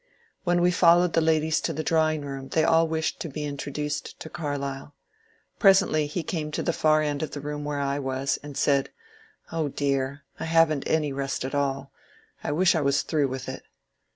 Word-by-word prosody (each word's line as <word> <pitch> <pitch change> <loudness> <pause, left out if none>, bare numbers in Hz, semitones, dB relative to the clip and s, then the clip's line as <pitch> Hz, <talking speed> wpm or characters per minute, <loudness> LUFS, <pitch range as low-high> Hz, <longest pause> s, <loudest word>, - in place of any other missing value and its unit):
When 175 0 +2
we 180 - +4
followed 175 0 +5
the 165 - +3
ladies 160 -1 +2
to 165 - -2
the 155 +1 -3
drawing 155 -1 +2
room 135 -1 -6
they 160 +4 +1
all 165 +1 +4
wished 160 0 -2
to 165 - -4
be 150 +1 -4
introduced 145 0 -4
to 160 - -8
Carlyle. 140 -2 -4 0.6
Presently 190 -7 +4
he 165 +3 -3
came 155 -3 -3
to - - -1
the 170 - 0
far 155 -1 +3
end 145 -1 -2
of 155 - -2
the 145 - -6
room 145 +1 -5
where 145 -1 -3
I 140 0 -1
was, 135 0 -1
and 145 -2 -8
said, 140 -2 +2 0.6
^^Oh, 160 -3 -1
dear, 140 0 -1
— - - -30
I - - -3
have 165 -1 +4
n't 140 - -4
any 150 -3 +1
rest 135 -1 -3
at 135 - -5
all 140 -1 -1 0.3
— - - -31
I - - -2
wish 175 +4 +4
I 160 - +1
was 140 0 +2
through 150 -3 +1
with 130 0 -6
it." - - -6
150 Hz, 210 wpm, -26 LUFS, 140-160 Hz, 0.6 s, followed